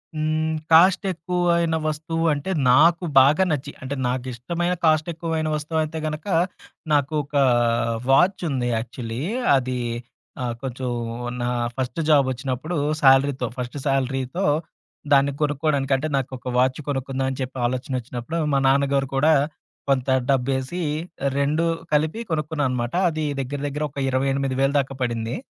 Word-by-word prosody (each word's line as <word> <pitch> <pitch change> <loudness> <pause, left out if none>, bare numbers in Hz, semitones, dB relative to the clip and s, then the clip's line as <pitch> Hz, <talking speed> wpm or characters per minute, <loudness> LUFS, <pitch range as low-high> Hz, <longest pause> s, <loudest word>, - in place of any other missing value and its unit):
హ్మ్. 155 +1 0 0.2
కాస్ట్ 185 +5 +6
ఎక్కువైన 170 -1 0
వస్తువు 165 +2 -2
అంటే, 145 +7 -3 0.2
నాకు 165 +7 +5 0.2
బాగా 150 +7 +5
నచ్చి, 145 0 -2
అంటే 135 +2 -4
నాకిష్టమైన 130 +8 -2
కాస్ట్ 155 +1 +3
ఎక్కువైన 160 -1 -2
వస్తువయితే 155 +1 -2
గనక 155 +5 -5 0.7
నాకు 145 +1 +2
ఒక 145 +1 -11 0.8
వాచ్ 180 +6 +4
ఉంది 125 -3 -1
యాక్చువల్లీ. 115 +1 -5 0.4
అది 130 -1 -2 0.6
ఆహ్, 120 -1 -1
కొంచెం 130 -1 -4 0.5
నా 120 - -1 0.3
ఫస్ట్ 130 +5 -3
జాబ్ 140 -3 +5
ఒచ్చినప్పుడు 130 +6 -4 0.3
సాలరీతో 135 -1 +4
ఫస్ట్ 125 +2 -5
సాలరీతో, 135 +5 -1 0.7
దాన్ని 140 0 +5
కొనుక్కోడానికి 145 -2 +1
అంటే 150 +4 -2
నాకొక 130 -1 -4
వాచ్ 130 +3 +2
కొనుక్కుందాం 135 -1 -2
అని 130 - -6
చెప్పి 130 +1 -5
ఆలోచనొచ్చినప్పుడు 125 +3 -3 0.2
మా 140 - +4
నాన్నగారు 140 0 +2
కూడా 155 +4 +4 0.6
కొంత 135 -1 +1 0.2
డబ్బేసి 135 +5 0 0.6
2 150 +4 +1 0.3
కలిపి 155 +8 +1
కొనుక్కున్నా 150 -1 -1
అనమాట. 120 +1 -2 0.2
అది 155 -1 -3 0.2
దెగ్గర 135 +2 -3
దెగ్గర 150 +2 -3
ఒక 140 - -18
28,000 135 +1 +1
దాకా 135 0 -2
పడింది. 115 -2 -2
140 Hz, 125 wpm, -23 LUFS, 130-155 Hz, 0.8 s, కాస్ట్